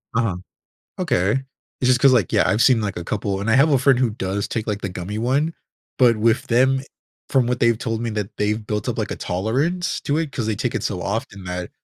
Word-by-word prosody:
Uh-huh. 115 -6 +1 0.6
Okay, 130 - +1 0.4
it's 125 - +2
just 125 -1 +4
'cause, 135 -1 +6
like, 110 -9 +2
yeah, - - +3
I've 110 - +2
seen, 125 -4 +5
like, 105 -3 -3
a 85 - -5
couple, 100 0 -2
and 105 +3 -1
I - - +4
have 140 +4 +5
a 135 - +5
friend 130 0 +4
who 125 -2 +2
does 100 -1 -3
take, 110 -2 -3
like, 105 -1 -2
the - - -3
gummy 90 +3 -5
one, 140 +8 0 0.4
but 120 -3 +5
with 115 +3 +1
them 130 +3 +3
e - - -11 0.4
from 130 -3 +2
what 125 +1 -1
they've 115 -2 +3
told 115 -1 -3
me 115 - -2
that 105 -2 -4
they've 105 +1 -1
built 105 -2 -2
up, - - -2
like, - - -2
a - - -3
tolerance 135 - -1
to 145 +2 0
it, 160 -3 -2
'cause 120 -6 -3
they 110 - 0
take 115 +4 -2
it - - -2
so 95 -3 -2
often 100 0 -4
that 90 -1 -5
115 Hz, 250 wpm, -22 LUFS, 100-130 Hz, 0.6 s, cause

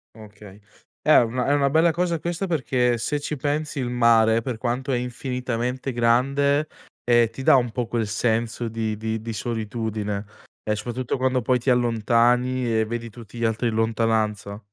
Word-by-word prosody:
Okay. 105 -2 -13 0.4
È - - +4
una 120 +1 +1
è 145 - +3
una 140 -1 +2
bella 160 +3 +4
cosa 170 -1 -1
questa 175 +4 -3
perché, 125 -6 +1
se 145 +6 -2
ci 150 +1 -4
pensi 145 +1 -2
il 125 -2 -2
mare, 115 -2 +4
per 120 0 -4
quanto 125 +4 -2
è 125 - +1
infinitamente 125 +1 -3
grande, 140 +5 +2 0.4
ehm, 120 -2 +4
ti 130 +4 -8
dà - - +6
un 120 -3 +2
po' 120 0 -2
quel 115 -2 -1
senso 115 +2 -1
di 110 -1 -3
di 110 0 -3
di 115 0 -5
solitudine, 110 -2 -3 0.4
e 105 - -1
soprattutto 120 +4 -3
quando 130 0 +1
poi 125 +2 +2
ti 125 +3 -2
allontani 120 0 +2
e 110 - +1
vedi 115 +1 -5
tutti 115 0 -12
gli 115 - -1
altri 115 +2 0
in 110 - -2
lontananza. 110 -2 0
120 Hz, 175 wpm, -23 LUFS, 110-130 Hz, 0.4 s, dà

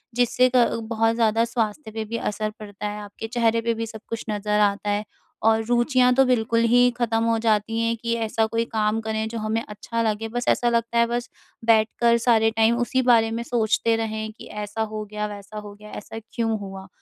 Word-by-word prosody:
जिससे 245 +1 +3
क 235 -1 +3
बहुत 225 0 +2
ज़्यादा 225 0 +2
स्वास्थ्य 225 +1 -3
पे 220 0 -4
भी 230 +2 -4
असर 215 0 -2
पड़ता 210 0 -6
है, 210 0 -5
आपके 205 +2 -8
चेहरे 230 -1 +1
पे 230 0 0
भी 230 0 -3
सब 220 -1 -9
कुछ 230 - -4
नज़र 210 0 0
आता 205 0 +1
है, 205 +1 0 0.4
और 225 0 +3
रुचियाँ 250 +1 +3
तो 270 - +5
बिल्कुल 230 -2 +2
ही 245 0 +6
ख़त्म 225 -1 +1
हो 230 0 +2
जाती 220 +1 +1
हैं 230 0 +1
कि 230 0 0
ऐसा 225 -1 0
कोई 230 +1 -1
काम 220 -1 0
करें 220 0 -2
जो 230 - -5
हमें 220 +1 -1
अच्छा 220 +2 -4
लगे। 220 +1 -3
बस 245 +1 -3
ऐसा 240 - +2
लगता 235 0 0
है 235 - +4
बस 240 0 -3 0.4
बैठकर 230 +1 +3
सारे 225 -1 +4
टाइम 225 +1 +3
उसी 260 +2 +1
बारे 230 -3 +4
में 230 +1 -3
सोचते 230 -1 +1
रहें 220 -1 -3
कि - - -12
ऐसा 210 +1 -5
हो 215 -1 -3
गया, 210 0 -4
वैसा 205 +1 -9
हो 205 -1 -9
गया। 210 +1 -13
ऐसा 225 +2 -7
क्यों 225 -2 0
हुआ? 195 -1 -8
225 Hz, 210 wpm, -24 LUFS, 215-235 Hz, 0.4 s, ही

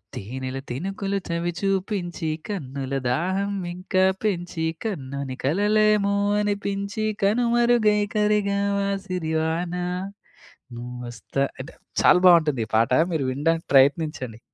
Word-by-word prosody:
తేనెల 130 +5 -5
తినుకులు 195 +7 -3
చవి 170 +1 -1
చూపించి, 190 -4 -1 0.2
కన్నుల 140 -8 -5 0.2
దాహం 190 +9 0 0.2
ఇంకా 185 +1 +1 0.2
పెంచి, 175 -5 -1 0.2
కమ్మని 140 -8 -4
కలవేమో 205 +5 +3 0.3
అనిపించి, 200 +1 -2 0.2
కనుమరుగై 235 -1 +3
కరిగావా, 200 -1 +1 0.2
సిరివాన. 165 0 -1 1.0
నువ్వొస్తా 125 +2 -4 0.2
అంటే 130 - -8 0.3
చాలా 180 - +7
బావుంటుంది 155 -8 +5
ఈ - - -24
పాట 115 +2 +2 0.2
మీరు 155 -4 0
వినడానికి 165 +5 0
ప్రయత్నించండి. 135 -4 +2
175 Hz, 95 wpm, -24 LUFS, 140-200 Hz, 1.0 s, చాలా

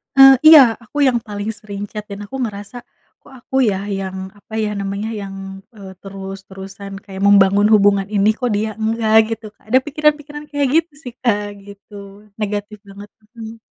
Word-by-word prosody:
Eee, 270 0 +9
iya, 315 -1 +11 0.2
aku 245 +5 -11
yang 250 -2 +2
paling 205 0 -5
sering 200 -1 -8
chat 210 -1 -6
dan 200 0 -7
aku 205 - -9
ngerasa 205 +1 -7 0.5
kok - - -18
aku - - -7
ya 195 - -1 0.2
yang 190 -1 -5 0.2
apa 210 - -18
ya 210 - -1
namanya 200 +2 -4
yang 195 -1 -7 0.4
eee, 195 -2 -11
terus-terusan 195 0 -9
kayak 195 -1 -9
membangun 200 0 +5
hubungan 200 -2 +3
ini 200 +1 +3
kok 250 -1 -2
dia 215 +2 -1
enggak 220 0 0 0.2
gitu 225 0 -16
Kak, - - -32
ada 255 +3 +5
pikiran-pikiran 295 0 -1
kayak 285 -1 0
gitu 330 0 +2
sih 245 - -8
Kak 210 -5 +1 0.2
gitu, 200 +1 -14 0.4
negatif 210 0 -4
banget. 200 +1 -12 0.3
Mmm. 225 0 -9
205 Hz, 170 wpm, -18 LUFS, 200-235 Hz, 0.5 s, iya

